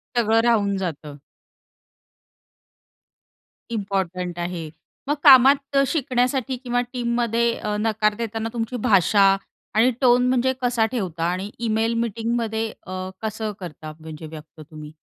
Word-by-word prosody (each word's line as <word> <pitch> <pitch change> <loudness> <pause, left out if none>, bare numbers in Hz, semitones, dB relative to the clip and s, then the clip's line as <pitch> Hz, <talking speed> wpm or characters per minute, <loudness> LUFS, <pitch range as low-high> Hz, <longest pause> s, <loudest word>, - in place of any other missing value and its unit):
सगळं 225 -1 +3
राहून 210 -4 +2
जातं. 155 -6 -5 2.6
इम्पोर्टंट 185 -4 -3
आहे. 175 -2 -4 0.4
मग 295 - +2
कामात 275 0 +6
शिकण्यासाठी 260 -2 0
किंवा 245 -1 -1
टीममध्ये 235 -1 0
अ, 210 0 -3
नकार 215 -1 +1
देताना 225 0 -4
तुमची 230 +1 -3
भाषा 195 0 +5 0.4
आणि 235 +4 +4
टोन 250 -1 +4
म्हणजे 260 +1 +2
कसा 240 -2 +2
ठेवता 180 -9 -3
आणि 190 +3 -4
इमेल, 225 0 0
मीटिंगमध्ये 225 0 -2 0.2
अ, 185 0 -5
कसं 220 0 -3
करता 155 -4 -8
म्हणजे 160 0 -9
व्यक्त 155 +1 -12
तुम्ही? 155 0 -11
220 Hz, 115 wpm, -23 LUFS, 185-240 Hz, 2.6 s, कामात